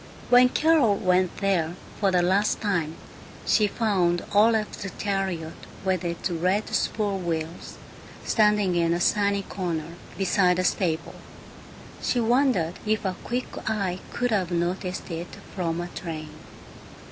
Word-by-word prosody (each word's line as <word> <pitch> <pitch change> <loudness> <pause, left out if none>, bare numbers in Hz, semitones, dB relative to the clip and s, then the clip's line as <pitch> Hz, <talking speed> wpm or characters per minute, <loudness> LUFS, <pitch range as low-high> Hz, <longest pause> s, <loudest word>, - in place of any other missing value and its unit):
When 250 0 +7
Carol 300 -8 +3
went 185 -1 +1
there, 180 -4 0 0.2
for 200 - +3
the 180 -2 +2
last 195 +4 +2
time, 170 -7 -1 0.5
she 210 - +4
found 190 -6 +1
Olaf's 215 +1 +3
chariot 190 -5 -2 0.3
with 185 -1 +1
its 170 -1 -2
red 185 +5 0
spool 205 -3 0
wheels 165 -1 -4 0.5
standing 210 -4 +3
in 170 -1 +2
the 175 - 0
sunny 200 +2 +2
corner 170 -4 -4 0.2
beside 185 -2 +3
the 185 - +1
stable. 170 -4 0 0.9
She 245 - +1
wondered 235 - +2
if 215 0 0
a 185 -1 -1
quick 245 +2 -2 0.2
eye 195 -4 -1
could 245 0 -1
have 190 -5 +1
noticed 180 +1 -2
it 170 +1 -6 0.2
from 170 -3 -1
a 175 - -3
train. 160 -3 -6
185 Hz, 135 wpm, -25 LUFS, 175-210 Hz, 0.9 s, When